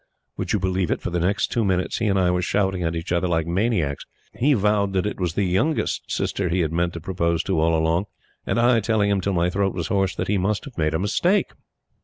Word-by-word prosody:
Would - - -3
you - - +2
believe 95 -2 -1
it, - - 0
for - - -4
the 85 - 0
next 95 +5 0
two 115 - +1
minutes, 95 -2 0
he 115 - 0
and 100 -1 +2
I 90 -2 +3
were 90 0 0
shouting 95 0 0
at 85 -1 -1
each 85 +2 -5
other 85 +1 +1
like 80 -2 0
maniacs 85 - 0 0.3
he 140 +3 +2
vowing 100 -2 +1
that 95 0 0
it 105 - -3
was 85 -3 -2
the 100 - +1
youngest 95 - 0
sister 95 -3 -1
he 90 +2 +1
had 80 -2 -1
meant 85 0 0
to 85 - -5
propose 85 -1 -1
to - - 0
all 80 +1 +3
along, 80 +4 +1 0.4
and - - -1
I 120 0 +4
telling 105 -1 +1
him 100 -1 +1
till 100 +2 -1
my 85 0 +1
throat 95 0 0
was 85 -4 -3
hoarse 95 -2 +1
that - - -3
he 100 -1 +1
must 100 +3 -1
have 135 -5 -11
made 75 -1 0
a - - 0
mistake! 175 - +1
95 Hz, 255 wpm, -23 LUFS, 85-100 Hz, 0.4 s, I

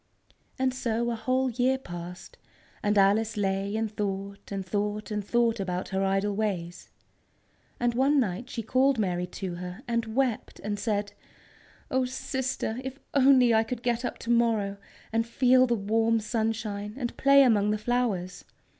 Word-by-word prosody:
And 260 -1 +1
so 235 -1 -1
a - - -1
whole 255 +3 0
year 255 +3 +2
passed, 175 -6 -9 0.4
and 205 0 +1
Alice 210 +3 +3
lay 195 0 -1
and 220 -1 -2
thought, 200 -1 -4
and 195 -1 -3
thought, 210 +2 -2
and 210 -1 -2
thought 235 +1 +1
about 180 -2 -3
her 195 0 0
idle 195 +1 +1
ways. 185 -5 -3 0.9
And 240 0 +1
one 275 +4 +3
night 235 +1 -2
she 230 - -4
called 260 +4 +3
Mary 180 -4 -1
to 180 0 -5
her, 180 0 -7
and 230 -2 -2
wept 255 -3 -1
and 205 0 -3
said: 205 -1 -1 0.8
"Oh, 260 0 +2
sister, 260 -2 -3
if 265 0 -6 0.2
only 260 -3 +5
I 220 0 +4
could 235 +1 -5
get 240 -1 0
up 245 - -3
to 235 - -3
morrow, 225 -4 +2 0.4
and 230 0 +1
feel 255 +1 +4
the 240 - +2
warm 225 +2 +1
sunshine 215 -2 -2
and 245 -3 -3
play 275 0 +6
among 210 -5 +3
the 215 - +1
flowers! 215 -6 -1
220 Hz, 165 wpm, -27 LUFS, 200-245 Hz, 0.9 s, play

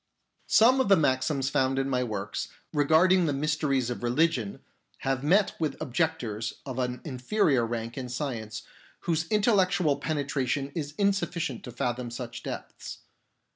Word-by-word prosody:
Some 250 +4 +6
of 230 - 0
the 195 - +8
maxims 135 -1 +1
found 135 0 +1
in 135 0 +1
my 125 -2 +1
works 105 -4 -3 0.3
re 145 -1 +2
garding 175 +3 +5
the 145 - +1
mysteries 140 -3 0
of 120 - -5
religion 120 -3 0 0.4
have 135 -1 -1
met 195 +7 +3
with 155 -4 -2
objectors 120 -7 -2
of 130 -2 -5
an 125 0 -2
inferior 135 - +1
rank 115 +2 -4
in 125 -1 -5
science, 115 -5 -4 0.4
whose 165 -1 -1
intellectual 185 - +3
penetration 140 -2 -1
is 150 -3 -4
insufficient 185 -4 0
to 125 - -7
fathom 120 +1 -2
such 120 0 -6
depths. - - -7
140 Hz, 145 wpm, -28 LUFS, 125-165 Hz, 0.4 s, the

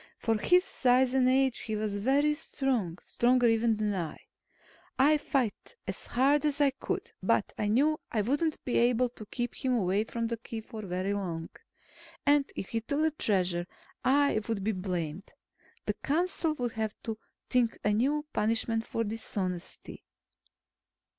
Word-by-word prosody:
For 225 -1 +1
his 360 +10 +5
size 255 -5 +3
and 255 -1 +4
age, 265 -1 +3
he 220 - -3
was 210 -1 -2
very 280 +7 +3
strong 260 - -2
stronger, 245 0 +3
even, 225 0 +3
than 210 -1 0
I. 170 -5 -3 0.8
I 295 +3 +5
fought 260 - -2
as - - -4
hard 275 +4 +3
as 295 -1 +1
I 285 -2 +4
could, - - -4
but - - +1
I 210 - -1
knew 290 +8 +3
I 220 - +1
wouldn't 295 +7 0
be 250 - +1
able 245 +1 +3
to 220 -3 -11
keep 240 +1 -3
him 255 -1 0
away 200 0 +1
from 230 0 -3
the 230 0 -2
Key 225 0 -6
for 220 0 -8
very 185 0 -2
long. 170 -5 -3 0.8
And 285 -1 +3
if 190 - -5
he 225 - -1
took 285 +6 -1
the 315 0 +3
Treasure, 180 - +1 0.4
I 275 -3 +3
would 220 -4 -2
be 220 - +1
blamed. 180 -2 -4 0.5
The - - 0
council 325 +1 0
would 245 -4 -2
have 220 -1 -3
to 220 -1 -4 0.3
think 245 -3 +2
a 210 - +2
new 285 +7 +1
punishment 225 +1 0
for 230 - -1
dishonesty. 195 -5 -5
230 Hz, 165 wpm, -30 LUFS, 210-270 Hz, 0.8 s, his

